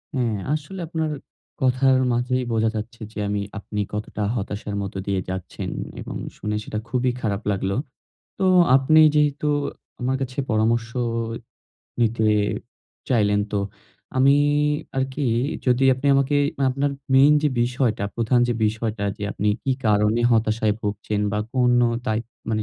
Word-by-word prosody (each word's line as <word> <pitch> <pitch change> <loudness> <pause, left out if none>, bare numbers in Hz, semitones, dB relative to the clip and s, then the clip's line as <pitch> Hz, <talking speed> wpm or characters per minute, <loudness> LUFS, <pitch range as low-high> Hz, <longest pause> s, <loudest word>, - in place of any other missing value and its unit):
হ্যাঁ 120 -5 0 0.2
আসলে 155 +6 -4
আপনার 160 -1 -2 0.5
কথার 130 0 +4 0.2
মাঝেই 125 +1 0
বোঝা 110 0 +2
যাচ্ছে 115 +2 -6
যে 110 - -13
আমি 100 0 -1 0.2
আপনি 105 0 -5
কতটা 105 0 -3
হতাশার 105 -1 -4
মধ্য 100 0 -5
দিয়ে 95 -2 0
যাচ্ছেন 95 -1 -5 0.3
এবং - - -7 0.2
শুনে 105 0 -3
সেটা 105 - -4
খুবই 125 0 +1
খারাপ 100 -2 -1
লাগলো। 95 0 -1 0.6
তো - - 0 0.3
আপনি 140 +4 +5
যেহেতু 150 0 +2 0.5
আমার 130 +2 0
কাছে 130 0 -6
পরামর্শ 115 +1 +1 1.1
নিতে 115 -1 +2 0.8
চাইলেন। 105 -5 +3
তো 105 - +1 0.6
আমি 135 +2 +5 0.6
আরকি 135 +2 -1 0.4
যদি 125 +1 +3
আপনি 130 +3 -4
আমাকে 140 +1 +2 0.2
মা 140 - +2
আপনার 140 +2 0 0.2
মেইন 140 +3 +7
যে 150 - +3
বিষয়টা 120 -3 0
প্রধান 120 +1 +2
যে - - +2
বিষয়টা, 110 -1 -1
যে 105 - -9
আপনি 105 - -1
কি 135 - +1
কারণে 105 +2 +3
হতাশায় 110 -1 +2
ভুগছেন 105 0 -2
বা 105 - 0 0.2
কোনো 125 -1 +4 0.2
দায়ি 110 0 +1 0.3
মানে 110 -1 0
115 Hz, 140 wpm, -23 LUFS, 105-130 Hz, 1.1 s, মেইন